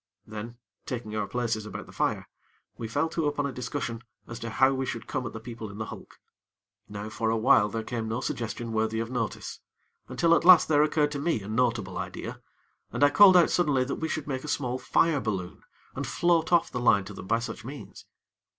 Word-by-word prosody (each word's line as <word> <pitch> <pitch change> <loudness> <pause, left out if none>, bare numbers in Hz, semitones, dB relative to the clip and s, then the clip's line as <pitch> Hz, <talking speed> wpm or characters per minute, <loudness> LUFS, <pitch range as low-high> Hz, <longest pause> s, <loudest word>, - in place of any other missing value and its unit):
Then, 110 +2 -8 0.3
taking 115 -4 -4
our 105 -2 -1
places 115 -3 -2
about - - -7
the - - -14
fire, - - -1 0.5
we 115 - -5
fell 120 +8 0
to 160 -2 -1
upon 145 -1 -1
a 140 - -2
discussion 120 -2 -4 0.2
as 120 -1 -8
to 115 0 -5
how 130 +4 +3
we 135 0 -1
should 115 -1 -4
come 130 -2 -3
at - - -8
the 110 - -6
people 115 -1 -8
in 100 - -10
the 110 - -3
hulk. - - -11 0.7
Now, 105 0 -6
for 110 +1 -1
a 115 - +1
while 110 -1 +4
there 110 +1 -3
came 115 -1 -4
no 110 +2 -2
suggestion 115 -2 -4
worthy 110 0 0
of 115 +1 -3
notice, 120 -3 -4 0.5
until 170 0 +2
at 170 - +3
last 180 -1 +8
there 150 -2 +4
occurred 150 -1 +2
to 145 - -3
me 145 -8 0
a - - -8
notable 110 -4 0
idea, - - -6 0.5
and - - 0
I 145 - +6
called 190 +3 +8
out 175 - +5
suddenly 145 -7 +2
that 135 - -3
we 160 - 0
should 155 -2 -3
make 130 -2 -3
a - - -7
small 130 -3 -1
fire 160 +1 +2
balloon, 95 -7 -4 0.3
and - - -4
float 170 -1 +1
off 170 -1 +3
the 125 - -3
line 105 -5 +4
to 105 - -8
them 95 - -9
by 115 - +3
such 115 0 -6
means. 135 +4 -10
120 Hz, 225 wpm, -27 LUFS, 110-145 Hz, 0.7 s, last